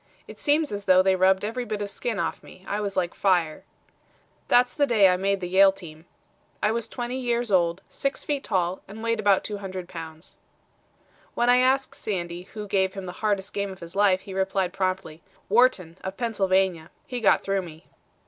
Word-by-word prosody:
It -, -, -12 dB
seems 300 Hz, +1 st, +2 dB
as 205 Hz, -1 st, -5 dB
though 185 Hz, -1 st, +6 dB
they 190 Hz, 0 st, +3 dB
rubbed 190 Hz, +1 st, +3 dB
every 240 Hz, +4 st, -3 dB
bit 215 Hz, -3 st, -4 dB
of 205 Hz, -1 st, -4 dB
skin 230 Hz, 0 st, -3 dB
off -, -, -1 dB
of -, -, -32 dB
me. 185 Hz, -, -15 dB
I 205 Hz, +1 st, -2 dB
was 200 Hz, -1 st, -3 dB
like 175 Hz, -2 st, 0 dB
fire. 175 Hz, -5 st, +1 dB, 0.8 s
"That's 245 Hz, 0 st, +4 dB
the 285 Hz, -2 st, +2 dB
day 215 Hz, -6 st, +5 dB
I 180 Hz, -, +4 dB
made 195 Hz, +1 st, 0 dB
the 180 Hz, -, -3 dB
Yale 190 Hz, +2 st, +6 dB
team. 165 Hz, -3 st, -12 dB, 0.5 s
"I 210 Hz, -, +1 dB
was 230 Hz, 0 st, -2 dB
twenty 245 Hz, +1 st, -4 dB
years 240 Hz, -2 st, -1 dB
old, 175 Hz, 0 st, +2 dB
six 275 Hz, -1 st, -3 dB
feet 285 Hz, -2 st, -2 dB
tall, 185 Hz, -2 st, -1 dB
and 215 Hz, +3 st, -9 dB
weighed 230 Hz, -1 st, 0 dB
about 200 Hz, -2 st, +3 dB
200 190 Hz, -3 st, -6 dB
pounds." 160 Hz, -1 st, -9 dB, 1.0 s
When 240 Hz, +1 st, +3 dB
I 250 Hz, -, +6 dB
asked 265 Hz, +1 st, +2 dB
Sandy 175 Hz, -2 st, -4 dB
who 210 Hz, -1 st, -5 dB
gave 190 Hz, -1 st, +1 dB
him 195 Hz, -1 st, -6 dB
the 180 Hz, -, -5 dB
hardest 200 Hz, -3 st, -1 dB
game 200 Hz, -1 st, -2 dB
of 190 Hz, -, -11 dB
his 170 Hz, +1 st, -9 dB
life, 195 Hz, -2 st, +3 dB
he 195 Hz, -, -9 dB
replied 190 Hz, -1 st, -1 dB
promptly: 185 Hz, -4 st, -3 dB, 0.3 s
"Wharton, 195 Hz, -7 st, +2 dB
of 190 Hz, +1 st, -5 dB
Pennsylvania. 190 Hz, -7 st, 0 dB, 0.2 s
He 250 Hz, -2 st, -5 dB
got -, -, +4 dB
through 195 Hz, 0 st, 0 dB
me." 165 Hz, -1 st, -12 dB
195 Hz, 200 wpm, -25 LUFS, 185-220 Hz, 1.0 s, though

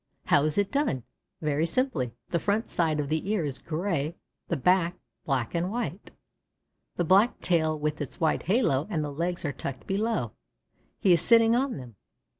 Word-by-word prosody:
How 145 Hz, -, +4 dB
is 155 Hz, -1 st, 0 dB
it 205 Hz, -1 st, +1 dB
done? 280 Hz, -, 0 dB, 0.4 s
Very 155 Hz, +1 st, +1 dB
simply. 165 Hz, -, -1 dB
The 170 Hz, -, 0 dB
front 210 Hz, +6 st, 0 dB
side 160 Hz, -3 st, +1 dB
of 145 Hz, -, -1 dB
the 160 Hz, +6 st, -2 dB
ear 205 Hz, -7 st, +1 dB
is 140 Hz, -2 st, -4 dB
gray, 165 Hz, -2 st, -2 dB, 0.3 s
the 170 Hz, -, -1 dB
back, 180 Hz, +4 st, +2 dB, 0.3 s
black 130 Hz, -5 st, -1 dB
and 170 Hz, +2 st, 0 dB
white. 210 Hz, -, -4 dB, 0.9 s
The 175 Hz, -, 0 dB
black 195 Hz, +8 st, +4 dB
tail 160 Hz, -3 st, +2 dB
with 150 Hz, 0 st, -2 dB
its 140 Hz, -, -6 dB
white 160 Hz, -2 st, +2 dB
halo, 180 Hz, -, +2 dB
and 155 Hz, -3 st, -1 dB
the 145 Hz, -, -4 dB
legs, 170 Hz, +3 st, -2 dB
are 145 Hz, -, -1 dB
tucked 130 Hz, -2 st, -6 dB
below. 195 Hz, -, -1 dB, 0.7 s
He 185 Hz, -, +5 dB
is 170 Hz, -, +3 dB
sitting 230 Hz, 0 st, +5 dB
on 265 Hz, -, 0 dB
them. 120 Hz, -6 st, -10 dB
165 Hz, 180 wpm, -27 LUFS, 150-200 Hz, 0.9 s, He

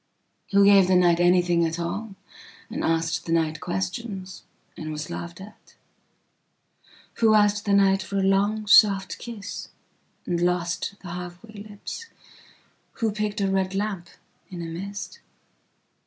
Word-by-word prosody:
Who 200 Hz, 0 st, +5 dB
gave 200 Hz, -2 st, +6 dB
the 185 Hz, -, +3 dB
night 175 Hz, -1 st, +4 dB
anything 175 Hz, -1 st, +3 dB
at 165 Hz, 0 st, -1 dB
alland 195 Hz, +5 st, -4 dB, 0.6 s
asked 165 Hz, 0 st, -1 dB
the -, -, -2 dB
night 160 Hz, -2 st, +1 dB
questionsand 190 Hz, +1 st, -4 dB, 0.5 s
was 150 Hz, 0 st, -5 dB
laughed 170 Hz, +1 st, -6 dB
at? 205 Hz, +3 st, -14 dB, 1.4 s
Who 220 Hz, -2 st, +4 dB
asked 210 Hz, 0 st, +3 dB
the 200 Hz, -, +1 dB
nightfor 195 Hz, 0 st, +2 dB
a -, -, +2 dB
long 205 Hz, +2 st, +1 dB
soft 200 Hz, -2 st, +5 dB
kissand 220 Hz, -4 st, -7 dB, 0.7 s
lost 175 Hz, +2 st, -1 dB
the 180 Hz, -, -8 dB
half 175 Hz, +1 st, -7 dB
way 215 Hz, -2 st, -11 dB
lips?who 225 Hz, -, -8 dB
picked 210 Hz, 0 st, -2 dB
a 195 Hz, -, +2 dB
red 190 Hz, 0 st, 0 dB
lamp 195 Hz, -4 st, -3 dB, 0.4 s
in 175 Hz, -2 st, -6 dB
a -, -, -5 dB
mist? 195 Hz, +5 st, -7 dB
195 Hz, 125 wpm, -25 LUFS, 175-205 Hz, 1.4 s, gave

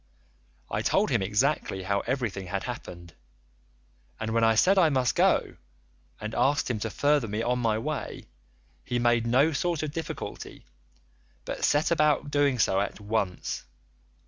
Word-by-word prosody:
I -, -, -1 dB
told -, -, +1 dB
him -, -, +2 dB
exactly 105 Hz, 0 st, 0 dB
how 100 Hz, +1 st, 0 dB
everything 110 Hz, -7 st, -3 dB
had 95 Hz, +1 st, -3 dB
happened, 85 Hz, -8 st, -8 dB, 1.1 s
and 110 Hz, 0 st, -3 dB
when 115 Hz, 0 st, +2 dB
I 115 Hz, 0 st, +4 dB
said 190 Hz, -, +4 dB
I 165 Hz, -4 st, +5 dB
must 130 Hz, -4 st, +1 dB
go, -, -, +2 dB, 0.6 s
and 110 Hz, +1 st, -5 dB
asked 140 Hz, 0 st, +1 dB
him 110 Hz, -, -2 dB
to 110 Hz, -, -3 dB
further 145 Hz, +1 st, +1 dB
me 105 Hz, +2 st, -2 dB
on 125 Hz, +1 st, 0 dB
my 115 Hz, -3 st, +1 dB
way, 145 Hz, +5 st, -4 dB, 0.6 s
he 125 Hz, -, -2 dB
made 120 Hz, -1 st, +2 dB
no 135 Hz, +7 st, +4 dB
sort 165 Hz, +2 st, -1 dB
of 150 Hz, -, -3 dB
difficulty, 165 Hz, +2 st, -7 dB, 0.8 s
but -, -, -5 dB
set 145 Hz, +3 st, +2 dB
about 150 Hz, -3 st, +2 dB
doing 145 Hz, -3 st, +2 dB
so 95 Hz, -4 st, +2 dB
at 100 Hz, +1 st, -3 dB
once. 105 Hz, -3 st, -2 dB
120 Hz, 155 wpm, -27 LUFS, 105-145 Hz, 1.1 s, I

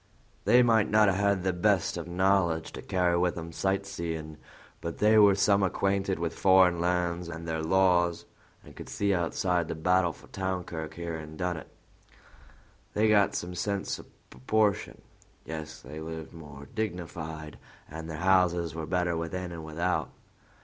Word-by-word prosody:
They 125 Hz, +1 st, +6 dB
may 115 Hz, -3 st, +4 dB
not 105 Hz, -1 st, +4 dB
have 95 Hz, -, +1 dB
had 100 Hz, -2 st, +2 dB
the 95 Hz, -1 st, +1 dB
best 90 Hz, -, +1 dB
of -, -, -5 dB
knowledge 90 Hz, -2 st, +1 dB
to -, -, -8 dB
carry 90 Hz, -2 st, +1 dB
with 90 Hz, -1 st, 0 dB
'em 85 Hz, 0 st, -6 dB
sight 95 Hz, +3 st, -1 dB
seein', 80 Hz, -5 st, -5 dB, 0.4 s
but 85 Hz, -1 st, -5 dB
they 110 Hz, +1 st, +5 dB
were 100 Hz, -2 st, +7 dB
some 100 Hz, +1 st, +3 dB
acquainted 95 Hz, 0 st, 0 dB
with 85 Hz, -1 st, -2 dB
foreign 95 Hz, -2 st, +4 dB
lands 90 Hz, -1 st, 0 dB
an' 85 Hz, 0 st, -7 dB
their 80 Hz, -1 st, -2 dB
laws, 90 Hz, 0 st, +2 dB, 0.4 s
an' -, -, -14 dB
could -, -, -10 dB
see 100 Hz, -1 st, 0 dB
outside 90 Hz, -1 st, 0 dB
the -, -, -4 dB
battle 90 Hz, +2 st, +2 dB
for -, -, -16 dB
town 95 Hz, -1 st, -2 dB
clerk 80 Hz, -2 st, -6 dB
here 85 Hz, -1 st, -4 dB
in 80 Hz, 0 st, -9 dB
Dunnet; 90 Hz, -3 st, -3 dB, 1.3 s
they 110 Hz, +1 st, +3 dB
got 100 Hz, -3 st, +4 dB
some 90 Hz, +1 st, -4 dB
sense 100 Hz, +2 st, -2 dB
o' -, -, -11 dB, 0.3 s
proportion. 100 Hz, +11 st, 0 dB, 0.4 s
Yes, 80 Hz, -1 st, -7 dB
they 75 Hz, +1 st, -9 dB
lived 80 Hz, -2 st, -7 dB
more 75 Hz, -3 st, -11 dB
dignified, 80 Hz, -7 st, -5 dB, 0.3 s
and 80 Hz, +1 st, -8 dB
their 80 Hz, -, -5 dB
houses 90 Hz, -3 st, +2 dB
were 80 Hz, -1 st, -5 dB
better 90 Hz, 0 st, 0 dB
within 85 Hz, +2 st, -4 dB
an' 85 Hz, -1 st, -7 dB
without. 85 Hz, +3 st, -1 dB
90 Hz, 165 wpm, -28 LUFS, 80-95 Hz, 1.3 s, were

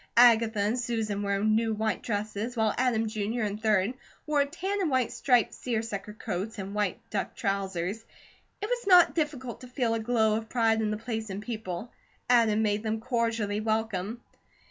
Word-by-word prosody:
Agatha 230 Hz, -2 st, +6 dB
and 210 Hz, +5 st, +1 dB
Susan 220 Hz, -4 st, -2 dB
were 200 Hz, -1 st, 0 dB
in 215 Hz, +2 st, +2 dB
new 225 Hz, -1 st, +1 dB
white 220 Hz, -1 st, -1 dB
dresses, 215 Hz, +2 st, -3 dB
while 220 Hz, -2 st, +2 dB
Adam 235 Hz, -3 st, +1 dB
Jr. 220 Hz, +2 st, -2 dB
and 210 Hz, 0 st, -3 dB
3d 215 Hz, 0 st, +2 dB, 0.3 s
wore 300 Hz, -2 st, +3 dB
tan 380 Hz, +7 st, -3 dB
and 350 Hz, -, +1 dB
white 260 Hz, -4 st, +1 dB
striped 245 Hz, -3 st, +2 dB
seersucker 220 Hz, -4 st, -3 dB
coats, 215 Hz, +1 st, -4 dB
and 195 Hz, 0 st, -5 dB
white 205 Hz, -3 st, -2 dB
duck 200 Hz, -, -2 dB
trousers. 195 Hz, +1 st, -2 dB, 0.6 s
It -, -, +1 dB
was 480 Hz, -2 st, -2 dB
not 360 Hz, -3 st, +7 dB
difficult 280 Hz, -7 st, -3 dB
to 250 Hz, -, -9 dB
feel 245 Hz, -2 st, 0 dB
a 230 Hz, -, 0 dB
glow 220 Hz, -2 st, +2 dB
of 220 Hz, 0 st, -6 dB
pride 225 Hz, -2 st, +2 dB
in 215 Hz, -, 0 dB
the 215 Hz, -, -1 dB
place 220 Hz, -1 st, -4 dB
and 190 Hz, +1 st, -4 dB
people. 215 Hz, -2 st, -5 dB, 0.4 s
Adam 220 Hz, -3 st, +4 dB
made 210 Hz, -1 st, +1 dB
them 220 Hz, 0 st, -2 dB
cordially 230 Hz, -3 st, -1 dB
welcome. 220 Hz, 0 st, -2 dB
220 Hz, 180 wpm, -28 LUFS, 210-240 Hz, 0.6 s, not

